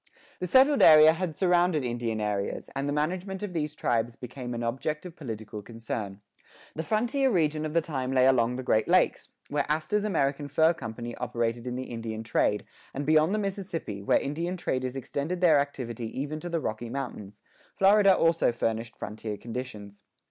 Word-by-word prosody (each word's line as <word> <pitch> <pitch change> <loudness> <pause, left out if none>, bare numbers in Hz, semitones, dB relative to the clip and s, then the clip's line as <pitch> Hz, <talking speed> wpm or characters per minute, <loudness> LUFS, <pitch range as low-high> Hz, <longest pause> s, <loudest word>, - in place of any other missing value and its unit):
This 180 - -3
settled 270 - +5
area 155 0 +9
had 165 -2 -3
surrounded 175 -4 +2
Indian 120 -2 -2
areas, 105 -2 -3
and 140 +1 -1
the - - 0
management 185 +6 -2
of 200 -3 -4
these 150 -2 -2
tribes 120 -3 0
became 125 -1 -7
an 120 - -3
object 135 +7 -2
of 175 -2 -9
political 110 -6 -7
concern. 110 -3 -6 0.5
The 160 - -3
frontier 245 - +1
region 155 -6 +1
of 155 - -7
the 170 - +4
time 135 -5 -3
lay 130 -1 +4
along 125 -2 +3
the 130 - -4
Great 110 -3 +2
Lakes, - - +2 0.2
where 145 0 -1
Astor's 160 +7 0
American 145 -7 0
Fur 160 +4 +3
Company 120 -3 -6
operated 115 +1 -2
in 125 - -3
the 130 - -3
Indian 115 -1 -5
trade,[6:3] 105 -1 +1 0.3
and 140 +1 -3
beyond 155 +3 +4
the 215 - +1
Mississippi, 190 - -4
where 100 - +3
Indian 170 +6 -3
traders 130 -5 -2
extended 145 +6 -3
their 165 -5 +5
activity 125 -5 -3
even 150 +3 -3
to 175 - -6
the 170 -1 0
Rocky 115 -4 -4
Mountains; 115 -6 -6 0.3
Florida 195 0 +6
also 165 -5 +3
furnished 115 0 -2
frontier 105 -1 -6
conditions. 110 -4 -7
140 Hz, 175 wpm, -28 LUFS, 115-165 Hz, 0.5 s, area